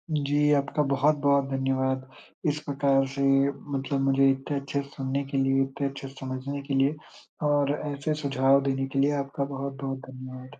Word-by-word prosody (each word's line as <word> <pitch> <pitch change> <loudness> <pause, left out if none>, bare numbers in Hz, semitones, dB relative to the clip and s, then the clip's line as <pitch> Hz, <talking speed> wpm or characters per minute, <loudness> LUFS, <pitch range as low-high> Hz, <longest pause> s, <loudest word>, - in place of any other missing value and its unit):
जी, 145 0 +2
आपका 140 +2 0
बहुत-बहुत 140 0 +3
धन्यवाद। 130 0 0 0.4
इस 150 +1 -1
प्रकार 140 -1 +2
से 135 +1 -5 0.5
मतलब 135 +1 -1
मुझे 135 0 +4
इतने 135 +2 -3
अच्छे 140 +1 -2
सुनने 140 0 -3
के 140 0 -3
लिए, 135 0 +3
इतने 135 +1 -4
अच्छे 135 0 -8
से 135 - -12
समझने 135 +2 -4
के 140 0 -5
लिए 135 +3 +3 0.5
और 145 -1 +3 0.2
ऐसे 140 +2 -2
सुझाव 135 0 +4
देने 135 0 -1
के 135 0 -2
लिए 140 +2 +4
आपका 140 0 -3
बहुत-बहुत 135 0 -4
धन्यवाद। 130 0 -10
135 Hz, 165 wpm, -27 LUFS, 135-140 Hz, 0.5 s, मुझे